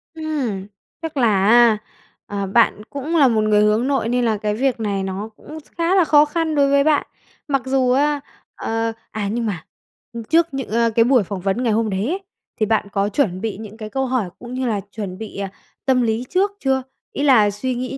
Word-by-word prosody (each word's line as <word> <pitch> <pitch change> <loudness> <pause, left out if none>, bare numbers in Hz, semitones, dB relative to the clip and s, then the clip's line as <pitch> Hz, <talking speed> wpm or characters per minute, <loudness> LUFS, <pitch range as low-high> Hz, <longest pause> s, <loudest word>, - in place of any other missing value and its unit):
Ừm, 270 -12 -3 0.3
chắc 320 -3 -5
là 210 -6 +3
á, 235 -1 +6 0.5
ờ, 200 -1 -3
bạn 210 +1 +3
cũng 285 +4 -3
là 290 -5 +6
một 225 -3 +2
người 210 -1 +3
hướng 215 +4 +2
nội, 270 -5 0
nên 245 0 +1
là 220 -2 +1
cái 210 0 -1
việc 260 0 0
này 200 -3 -1
nó 195 +3 -4
cũng 310 - -10 0.2
khá 340 +2 +2
là 375 - +5
khó 300 -2 +5
khăn 315 0 -1
đối 280 -1 +3
với 280 0 +4
bạn. 300 -1 +2 0.4
Mặc 275 -3 +1
dù 260 -1 +2
á, 290 +3 +2 0.4
ờ, 225 0 -2 0.2
à, 215 -2 -3
nhưng 235 0 -1
mà, 195 -7 -3 0.5
ừm, 230 -1 -6
trước 330 +7 +3
những 270 -1 -4
à, 230 +1 +2
cái 230 0 +5
buổi 250 -4 +4
phỏng 190 0 -5
vấn 195 +6 -1
ngày 230 -3 +2
hôm 225 0 +1
đấy 195 +3 -1
ấy, 360 +6 -1 0.4
thì 215 - +3
bạn 215 -1 +1
có 200 0 0
chuẩn 195 -6 0
bị 220 -3 -3
những 215 0 -10
cái 215 -2 -7
câu 265 +3 -1
hỏi 245 -8 -1
cũng 240 0 -9
như 255 -1 -2
là 210 -3 -1
chuẩn 195 -4 -6
bị, 220 -2 -8
à, 195 -1 -4 0.3
tâm 260 -2 +3
lý 230 +1 0
trước 390 +2 +2
chưa? 265 -1 0 0.3
Ý 285 - -2
là 230 -7 +5
suy 250 +5 -3
nghĩ 255 +2 -4
235 Hz, 225 wpm, -20 LUFS, 210-275 Hz, 0.5 s, á